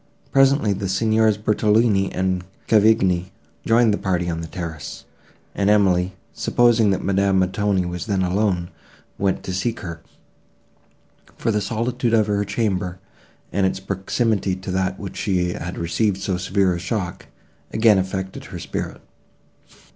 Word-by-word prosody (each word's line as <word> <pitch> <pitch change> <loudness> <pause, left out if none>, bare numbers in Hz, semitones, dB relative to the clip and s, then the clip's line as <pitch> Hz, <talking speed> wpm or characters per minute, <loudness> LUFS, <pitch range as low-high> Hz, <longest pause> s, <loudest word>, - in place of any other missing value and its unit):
Presently 135 -5 +4
the 95 0 -3
Signors 110 +2 +2
Bertolini 105 -1 +2
and 95 -1 -1 0.2
Cavigni 100 -5 +3 0.4
joined 115 -1 +4
the - - -1
party 90 -2 -1
on 80 0 -3
the 85 - -6
terrace, 80 -3 -7 0.5
and 100 0 +1
Emily, 95 -3 +3 0.2
supposing 120 -3 +3
that 95 - 0
Madame 100 0 +2
Montoni 95 0 +1
was 90 +1 -5
then 95 -3 +1
alone, 90 -2 0 0.5
went 95 -1 0
to 95 - -4
seek 115 +6 -2
her; 85 -3 -7 1.4
for 115 - 0
the 105 -1 0
solitude 120 +2 0
of 110 -2 +4
her 105 -1 0
chamber, 100 -3 -1 0.5
and 100 -1 +2
its 95 - -2
proximity 100 +1 -1
to 95 +1 -6
that 95 0 -1
where 100 - -6
she 90 -4 0
had 90 +3 -6
received 95 +4 0
so 95 -1 -2
severe 95 +1 +1
a 85 - -3
shock, 90 0 -4 0.4
again 110 -3 +4
affected 95 0 -4
her - - -8
spirit. - - -5
95 Hz, 145 wpm, -22 LUFS, 90-110 Hz, 1.4 s, Presently